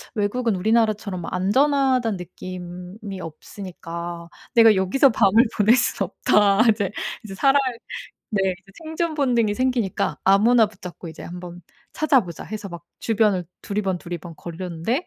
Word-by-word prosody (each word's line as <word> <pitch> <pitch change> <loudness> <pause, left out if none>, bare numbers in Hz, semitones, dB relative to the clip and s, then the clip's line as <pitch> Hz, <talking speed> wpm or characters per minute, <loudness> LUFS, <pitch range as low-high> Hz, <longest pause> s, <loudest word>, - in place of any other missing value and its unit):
외국은 220 +2 0
우리나라처럼 215 -2 +1
안전하다는 255 +3 +2
느낌이 180 +3 -8
없으니까 170 0 -8 0.3
'내가 225 -2 +7
여기서 190 +9 +4
밤을 220 +1 +5
보낼 215 +2 +5
수는 220 -6 0
없다.' 205 0 +3
이제 205 -3 -1 0.3
이제 205 -3 -8
살아야 275 +7 +4 0.7
네 205 -3 0 0.2
이제 195 +1 -21
생존 320 +1 -2
본능이 240 -7 +1
생기니까 250 -5 0
아무나 220 +5 +5
붙잡고 185 -4 -10
'이제 160 - -10
한번 175 0 -8 0.3
찾아보자.' 255 - +1
해서 215 -1 -6
막 170 0 -9 0.2
주변을 210 -5 +2 0.2
두리번두리번 180 -4 -4
거렸는데 175 - -3
205 Hz, 330 characters per minute, -23 LUFS, 180-230 Hz, 0.7 s, 내가